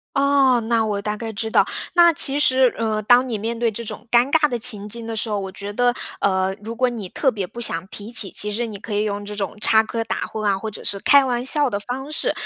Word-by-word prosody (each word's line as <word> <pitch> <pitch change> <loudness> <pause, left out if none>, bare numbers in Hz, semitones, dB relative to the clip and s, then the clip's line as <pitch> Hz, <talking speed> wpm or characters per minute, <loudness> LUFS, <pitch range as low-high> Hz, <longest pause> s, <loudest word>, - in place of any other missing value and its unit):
哦， 275 -3 +3
那 230 -1 +2
我 205 -2 -2
大 210 +1 -3
概 225 -1 -6
知 220 +2 -3
道。 - - +4 0.3
那 345 -1 +6
其 280 -1 +3
实， 260 -3 +4
呃， 220 -1 -1
当 245 +4 +4
你 230 -4 -2
面 230 +3 -3
对 230 -1 0
这 235 +2 -6
种 235 - -8
尴 245 +3 +4
尬 310 -2 +4
的 245 -4 -3
情 215 -3 +1
境 230 +1 -6
的 225 - -4
时 220 - -2
候， 210 -2 -1
我 190 -1 -6
觉 200 +1 -7
得， 245 +1 +2 0.3
呃， 190 -1 +1
如 225 +2 -6
果 255 +2 +2
你 225 -6 -5
特 265 +5 +1
别 200 -5 -4
不 235 - -10
想 175 -6 -2
提 210 +3 -8
起， 210 -5 +2
其 210 - 0
实 230 +3 -2
你 210 - -7
可 210 +1 -7
以 205 - +1
用 205 0 -4
这 210 0 -7
种 200 0 -4
插 220 +1 +4
科 225 +1 -3
打 - - -4
诨 215 -1 -6
啊， 200 -1 +2
或 220 - -4
者 215 - -9
是 200 - 0
开 280 +4 +5
玩 245 -1 -1
笑 290 +1 +2
的 200 -3 -3
方 265 +7 -6
式， - - -1
225 Hz, 290 characters per minute, -21 LUFS, 205-250 Hz, 0.3 s, 那